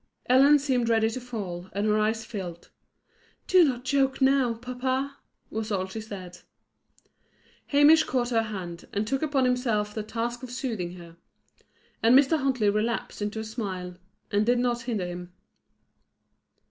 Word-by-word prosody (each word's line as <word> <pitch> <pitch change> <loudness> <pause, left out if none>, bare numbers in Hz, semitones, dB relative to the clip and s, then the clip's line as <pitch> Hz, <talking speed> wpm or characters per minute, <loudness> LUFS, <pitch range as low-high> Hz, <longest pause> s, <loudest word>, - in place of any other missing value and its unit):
Ellen 275 +4 +6
seemed 260 -4 0
ready 225 -1 +3
to 255 - -5
fall, 190 -7 -6
and 200 +2 -1
her 215 0 +2
eyes 220 +1 0
filled. 185 -7 -7 0.7
"Do 370 -1 +6
not 255 -4 0
joke 270 0 +1
now, 265 -3 +3
papa," 260 +3 -3 0.3
was 220 0 -3
all 190 -2 0
she 190 +4 -6
said. 185 -4 -9 1.3
Hamish 300 +2 +6
caught 245 -2 0
her 225 -1 +3
hand, 185 -6 -6
and 205 +1 0
took 270 +4 -1
upon 290 -4 +1
himself 230 -5 0
the 215 - -3
task 230 +3 -4
of 255 - -8
soothing 230 -9 -3
her. 170 -1 -13 0.8
And 235 +3 +6
Mr. 290 +3 +4
Huntley 255 -7 +2
relapsed 215 +1 -2
into 210 +2 -2
a - - -3
smile, 195 -5 -5 0.4
and 205 +1 +2
did 245 +3 +3
not 240 -1 0
hinder 230 -6 -2
him. 175 0 -7
230 Hz, 155 wpm, -27 LUFS, 205-260 Hz, 1.3 s, Ellen